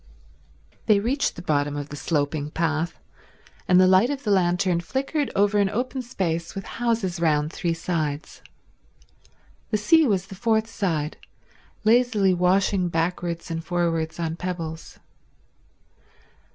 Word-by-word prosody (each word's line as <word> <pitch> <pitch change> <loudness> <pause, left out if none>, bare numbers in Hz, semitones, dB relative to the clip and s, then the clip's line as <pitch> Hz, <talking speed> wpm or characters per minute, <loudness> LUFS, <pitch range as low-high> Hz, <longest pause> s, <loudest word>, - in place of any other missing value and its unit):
They 210 -3 +5
reached 255 +7 0
the 175 - -8
bottom 145 -2 0
of 145 0 -5
the 145 - -7
sloping 145 -1 -1
path, 160 +1 -1 0.7
and 180 0 +5
the 185 - +7
light 190 +6 +5
of 285 -1 -3
the 210 - 0
lantern 180 -1 +2
flickered 275 - -2
over 205 +1 +3
an 200 -1 +3
open 255 +5 -2
space 170 -9 -3
with 195 - -5 0.2
houses 220 -7 0
round 155 -2 +1
three 170 -1 -1
sides. 155 -3 -3 1.3
The 215 - +1
sea 305 +9 +4
was 195 -4 +1
the 195 - -11
fourth 220 +2 +1
side, 165 -9 -2 0.7
lazily 220 -4 +3
washing 180 +1 +2
backwards 170 0 -2
and 165 0 -3
forwards 165 -2 -1
on 165 -1 -2
pebbles. 165 -3 -5
180 Hz, 135 wpm, -24 LUFS, 165-210 Hz, 1.3 s, the